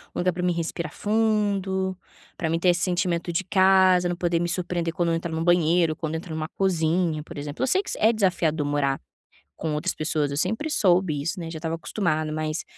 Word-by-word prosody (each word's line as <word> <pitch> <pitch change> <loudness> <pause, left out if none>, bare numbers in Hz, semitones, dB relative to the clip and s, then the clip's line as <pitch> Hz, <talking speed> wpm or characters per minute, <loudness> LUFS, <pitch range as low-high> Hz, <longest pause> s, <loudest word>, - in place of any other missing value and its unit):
Um - - -2
lugar 180 +1 +2
pra 180 +1 -4
mim 180 -1 +2
respirar 170 -1 -3
fundo, 205 -3 0 0.4
pra 160 - -1
mim 165 +1 0
ter 180 - +3
esse 175 0 +2
sentimento 175 -2 0
de 170 +3 -1
casa, 185 -1 +4
não 175 - -1
poder 175 -1 0
me 175 0 -1
surpreender 175 -1 -2
quando 170 0 0
eu - - +2
entrar 165 0 -4
em - - -2
um 165 - -1
banheiro, 170 -1 +3
quando 155 0 -4
entro 160 0 -6
em - - -3
uma 155 0 -3
cozinha, 165 -3 0
por 165 +1 -11
exemplo. 145 - -4
Eu - - +2
sei 375 +9 +2
que - - -8
isso - - -3
é 220 - +5
desafiador 175 -8 +1
morar 145 -2 0 0.6
com 155 -1 -2
outras 150 - -1
pessoas. 155 -2 -1
Eu 140 - -3
sempre 220 - -1
soube 180 - +2
isso, 170 +7 -3
né? 165 -1 -5
Já 165 - -6
estava 160 +1 -3
acostumada. 155 -4 -1
Mas, 155 +1 -2
170 Hz, 230 wpm, -25 LUFS, 160-185 Hz, 0.6 s, é